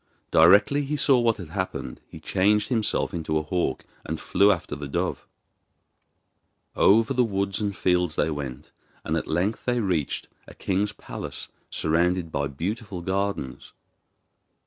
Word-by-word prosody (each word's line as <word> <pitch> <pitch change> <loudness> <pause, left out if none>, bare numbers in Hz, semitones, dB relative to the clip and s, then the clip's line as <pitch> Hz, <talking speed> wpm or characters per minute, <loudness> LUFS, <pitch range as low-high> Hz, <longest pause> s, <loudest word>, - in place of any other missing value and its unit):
Directly 100 - +6
he 150 +2 -2
saw 135 -3 +4
what 115 -2 +2
had 90 -5 -8
happened 95 +2 -4
he - - -11
changed 105 +2 +2
himself 110 -3 0
into 80 -2 -1
a 75 - -1
hawk 85 +3 -2 0.2
and - - -4
flew 100 +3 +4
after 85 -6 -2
the 75 -1 -6
dove. 70 - -2 1.5
Over 110 +5 +4
the 125 -1 +3
woods 100 -2 -1
and 100 -2 -2
fields 90 -3 +1
they 80 - +1
went, 70 -1 -6 0.3
and - - 0
at - - -2
length 90 +7 -1
they 125 -1 +1
reached 90 -9 -1 0.2
a - - -13
king's 100 +2 0
palace - - -7 0.2
surrounded 85 +1 0
by 70 -1 -1
beautiful 95 - -4
gardens. 95 -7 -3
95 Hz, 145 wpm, -25 LUFS, 80-105 Hz, 1.5 s, Directly